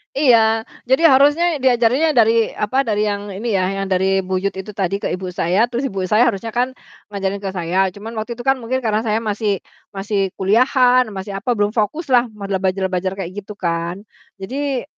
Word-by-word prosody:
Iya, 225 -5 +3 0.2
jadi 265 +7 +4
harusnya 290 +5 +4
diajarin 255 +5 +3
yang - - -7
dari, 225 0 +3
apa, 255 +6 0
dari 215 -3 0
yang 205 0 -3
ini 215 +3 -2
ya, 185 - +2 0.2
yang 195 - -2
dari 190 +1 +1
buyut 190 +1 -1
itu 200 +2 -7
tadi 195 -1 -1
ke - - -3
ibu 185 0 -6
saya, 190 +8 +1
terus 250 +3 -1
ibu 195 -5 -4
saya 215 +6 +3
harusnya 225 0 -2
kan 250 +3 -1 0.3
ngajarin 200 -1 -3
ke 195 - -5
saya, 180 +2 +1
cuman 215 +3 -8
waktu 235 +2 -5
itu 240 - -8
kan 270 0 +2
mungkin 255 +2 -3
karena 215 -2 +1
saya 220 +2 0
masih 210 -2 -1 0.3
masih 200 +1 -2 0.2
kuliahan, 250 +4 +3
masih, 190 +1 -6
apa, 245 +4 -1
belum 205 -1 +1
fokus 255 - -2
lah 245 -1 +4
modal 200 -3 -4
belajar-belajar 190 -1 -1
kayak 175 - -7
gitu 205 +1 -10
kan. 170 +1 -3 0.3
Jadi, 260 +7 -3
210 Hz, 190 wpm, -19 LUFS, 195-245 Hz, 0.3 s, jadi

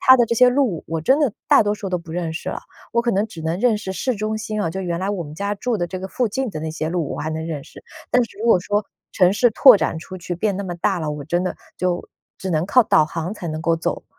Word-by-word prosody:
它 260 - +8
的 240 - +4
这 235 - 0
些 250 +2 +7
路， 250 - +1
我 165 0 -2
真 265 - +3
的 290 -8 +2 0.2
大 - - +7
多 205 0 +1
数 205 -2 -5
都 180 -1 -1
不 170 -1 -10
认 170 -2 -2
识 160 - -5
了， - - -4 0.3
我 235 0 +2
可 235 - +1
能 205 0 +1
只 170 -7 -10
能 165 +2 -1
认 230 0 +3
识 190 -2 -5
市 255 +6 -1
中 215 +1 -2
心 215 -1 -3
啊， 165 - -1
就 190 +3 -4
原 175 -2 -2
来 195 +2 -1
我 190 -4 -3
们 145 0 -9
家 200 +5 -2
住 240 +3 -1
的 175 - -1
这 185 +2 -5
个 190 - -5
附 245 +3 0
近 265 +5 -2
的 155 - -5
那 160 0 -3
些 155 0 -3
路， 170 -3 -2
我 - - -5
还 155 - -3
能 160 0 -3
认 150 -4 -5
识。 - - -14 0.3
但 250 - +5
是 230 - -15
如 225 - -2
果 225 -6 +5
说 205 +3 0 0.3
城 180 -1 +4
市 240 +4 +3
拓 250 +2 +8
展 165 - -1
出 185 +3 -9
去 175 0 -5
变 200 +2 0
那 200 - -3
么 180 -2 -4
大 185 +2 0
了， 155 -1 -2
我 150 -1 -5
真 175 +4 0
的 185 - -3 0.2
就 180 -1 -1 0.3
只 190 - -4
能 160 -1 +1
靠 250 +5 +5
导 155 - +4
航 165 +5 -4
才 175 -5 -6
能 155 0 -4
够 165 0 +2
走。 165 - -3
185 Hz, 325 characters per minute, -21 LUFS, 165-215 Hz, 0.3 s, 它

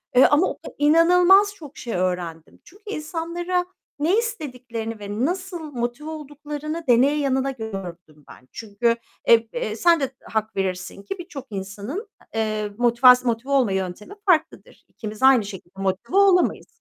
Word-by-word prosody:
eee, 255 - +8
ama 295 +6 +4
o - - -4
kad - - -10
inanılmaz 360 +6 +5
çok 300 -6 -12
şey 235 - -5
öğrendim. 180 -3 -3
Çünkü 400 +4 -19
insanlara 345 +2 -2 0.3
ne 345 +8 +2
istediklerini 250 - -4
ve 205 +4 -2
nasıl 360 +1 -3
motive 240 +5 -4
olduklarını 300 +1 -6
deneye 260 +5 +4
yanıla 270 -1 0
gördüm 180 - -8
ben. 130 - -15
Çünkü 225 +2 -1 0.3
eb 230 -1 +6
eee, 215 -3 -3
sen 335 +6 +4
de 270 -1 -3
hak 220 0 -3
verirsin 190 +1 -3
ki, 370 - -6
birçok 290 -6 -8
insanın, 205 - -6 0.3
eee, 215 -1 -1
motivas 250 +1 +6
motive 240 +3 -1
olma 255 -7 +3
yöntemi 190 - -4
farklıdır. 330 -4 0
İkimiz 215 +2 -8
aynı 260 -6 +6
şekilde 195 -1 -10
motive 195 - -1
olamayız. 390 -3 +4
255 Hz, 145 wpm, -23 LUFS, 210-320 Hz, 0.3 s, eee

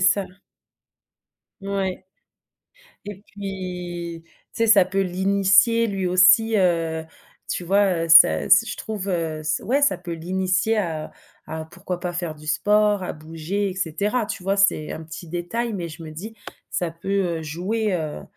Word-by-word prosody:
ça. 190 +1 +3 1.3
Ouais. 195 -1 -3 1.0
Et 205 -1 -7
puis 180 -4 -6
tu - - -31 0.2
sais 230 - 0
ça 215 -4 +6
peut 190 +2 -1
l'initier 195 +4 +3
lui 195 -2 -2
aussi, 185 +5 +5
heu, 165 -4 +1 0.4
tu 180 - -3
vois? 190 -2 +2
Heu, - - -6
ça 165 0 +7
s 225 +3 +5
je - - -5
trouve, 210 -3 -5
heu, 165 -4 -2
s 155 0 -1
ouais 275 +6 +1
ça 285 - +3
peut 175 -1 -7
l'initier 185 +5 0
à 160 -6 -3 0.4
à 160 0 -5
pourquoi 180 +2 -6
pas 175 0 -4
faire 170 -3 -4
du 150 - -14
sport, 210 +5 +2
à 180 - -4
bouger 165 +6 -4
et 185 - -7
cetera 200 +7 -1
tu 195 -3 -6
vois? 195 +1 +1
C'est 200 -6 +2
un 160 - -7
petit 165 +2 -9
détail 175 +8 -3
mais 175 -4 -4
je 165 +1 -10
me 155 - -8
dis: 215 +9 -9 0.3
«Ça 175 -2 -2
peut, 170 +4 -7 0.3
heu, - - -7
jouer, 190 +8 -2
heu, 155 -4 -3
185 Hz, 165 wpm, -23 LUFS, 165-200 Hz, 1.3 s, ça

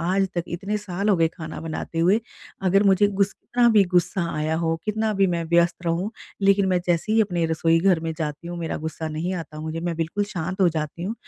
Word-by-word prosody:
आज 190 +3 +1
तक 175 - -1
इतने 195 +5 -3
साल 200 0 -3
हो 200 - +4
गए 165 -1 +3
खाना 160 -1 -8
बनाते 165 0 -5
हुए 185 +7 +4 0.4
अगर 195 +2 +4
मुझे 200 0 +4
गुस 200 -1 +1
कितना 240 -1 +1
भी 210 -3 +5
गुस्सा 180 0 +2
आया 155 +1 0
हो, 165 -1 0
कितना 215 0 0
भी 195 0 +3
मैं 170 -2 -1
व्यस्त 170 +1 +3
रहूँ 175 +6 0 0.3
लेकिन 195 0 +4
मैं 180 -1 +2
जैसे 175 +5 +1
ही 225 - +4
अपने 175 -5 +1
रसोई 165 +1 +2
घर 185 -3 +3
में 160 0 -3
जाती 150 +1 -4
हूँ 175 - -5
मेरा 165 -1 -3
गुस्सा 160 0 -4
नहीं 160 +4 -3
आता 155 -3 -6
मुझे, 160 +1 -4
मैं 170 -1 -2
बिल्कुल 165 +6 -1
शांत 185 -1 -4
हो 180 - +6
जाती 155 +1 -4
हूँ। 200 +5 -2
175 Hz, 230 wpm, -24 LUFS, 165-195 Hz, 0.4 s, हो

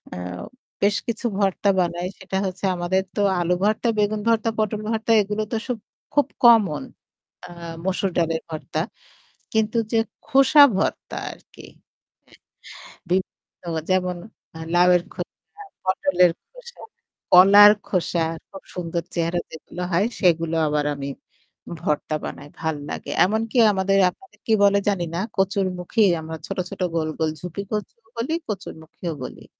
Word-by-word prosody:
আ - - -6 0.7
বেশ 205 0 +3
কিছু 235 +1 -3
ভর্তা 200 0 +1
বানাই 175 0 -1
সেটা 190 0 -4
হচ্ছে 190 +1 -4
আমাদের 180 +2 0
তো 205 - 0 0.2
আলু 175 0 +1
ভর্তা, 215 +3 +1
বেগুন 210 0 +1
ভর্তা, 230 -1 +2
পটল 215 -1 0
ভর্তা 225 0 -1
এগুলো 210 +1 -2
তো 230 - 0
সব 250 -2 -2 0.4
খুব 290 -2 +3 0.2
কমন 220 -10 +5 0.6
আ - - -13 0.3
মসুর 190 +1 0
ডালের 165 -1 0
ভর্তা। 155 0 -4 0.7
কিন্তু 220 +1 +1 0.2
যে 225 - +3 0.3
খোসা 275 +3 +6
ভর্তা 195 - -2
আরকি - - -14 1.2
অ্যা - - -15 0.2
বিভিন্ন 185 +1 -3 0.3
যেমন 180 -1 +1 0.6
লাউয়ের 180 0 +5
খোসা, 415 0 -10 0.2
পটলের 185 -1 +3 0.2
খোসা, - - -13 0.5
কলার 200 +3 +9 0.2
খোসা 175 -2 0 0.3
খুব 195 -1 -11
সুন্দর 170 -1 -3
চেহারা 170 0 0
যেগুলো 165 +2 -9
হয় 180 +4 +3
সেগুলো 165 -2 +2
আবার 150 0 0
আমি 140 0 -5 0.7
ভর্তা 150 0 -1
বানাই, 145 +1 -8
ভাল 160 -1 -1
লাগে। - - -5
এমনকি 220 +4 -1 0.2
আমাদের 195 0 +1
আপনাদের 385 - -17
কি 225 - +3
বলে 200 0 +5
জানি 190 -4 0
না - - -1 0.2
'কচুরমুখী' 195 +1 +1
আমরা 160 0 -6
ছোট-ছোট 185 +1 -5
গোল, 160 -1 0
গোল 160 -1 +1
'ঝুপি-কচু' 200 +5 -5 0.2
বলি, 235 +7 -2
'কচুরমুখীও' 170 -4 -6
বলি। - - -10
190 Hz, 135 wpm, -23 LUFS, 175-215 Hz, 1.2 s, কলার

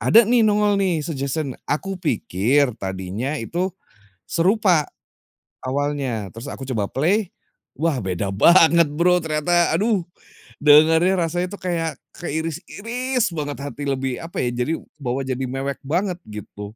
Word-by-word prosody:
ada 230 - +6
nih, 240 -1 +4
nongol 210 -1 +3
nih, 180 -5 +1
suggestion, 140 -2 -3
aku 190 +7 -2
pikir 130 - +1
tadinya 95 +7 -4
itu 175 +11 -2 0.6
serupa 180 -3 +3 0.8
awalnya, 135 -5 -2
terus 115 +4 -7
aku - - -8
coba 115 -6 -1
play, 185 +7 +1 0.5
wah, 160 -1 +1
beda 95 +1 -2
banget 170 - +6
Bro, 175 +3 +3
ternyata 160 +3 +2
aduh, 210 -4 +1 0.6
dengernya 160 +5 +6
rasanya 175 +2 -1
itu - - -10
kayak 170 -3 -1 0.2
keiris-iris 200 - -2
banget 145 -1 -3
hati 145 0 -6
lebih 135 -2 -2
apa 165 +1 -5
ya, 120 - 0
jadi 125 +5 -1 0.3
bawa 130 0 -2
jadi 130 0 -2
mewek 135 +1 -3
banget 175 +5 -1
gitu. 105 -1 -9
155 Hz, 130 wpm, -22 LUFS, 135-180 Hz, 0.8 s, ada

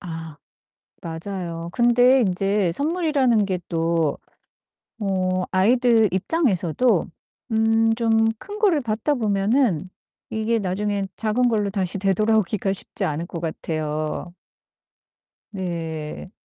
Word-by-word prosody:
아 165 -4 -7 0.7
맞아요. 170 0 -5
근데 245 +3 +4
인제 195 -2 +1
선물이라는 285 - +1
게 185 -2 -1
또 165 -2 0 0.8
어 185 -2 0
아이들 225 +3 +4
입장에서도 195 - +1 0.4
음 225 0 +3
좀 225 -1 +2
큰 415 - -8
거를 375 -8 +3
받다 230 +4 -1
보면은 205 - +1 0.4
이게 220 +1 0
나중에 200 +1 -1
작은 235 +3 +2
걸로 210 -3 0
다시 190 -1 -1
되돌아오기가 205 0 +1
쉽지 195 - 0
않을 155 +3 -3
것 170 - -6
같아요. 155 0 -3 1.2
네. 165 -4 -5
200 Hz, 220 characters per minute, -23 LUFS, 175-230 Hz, 1.2 s, 근데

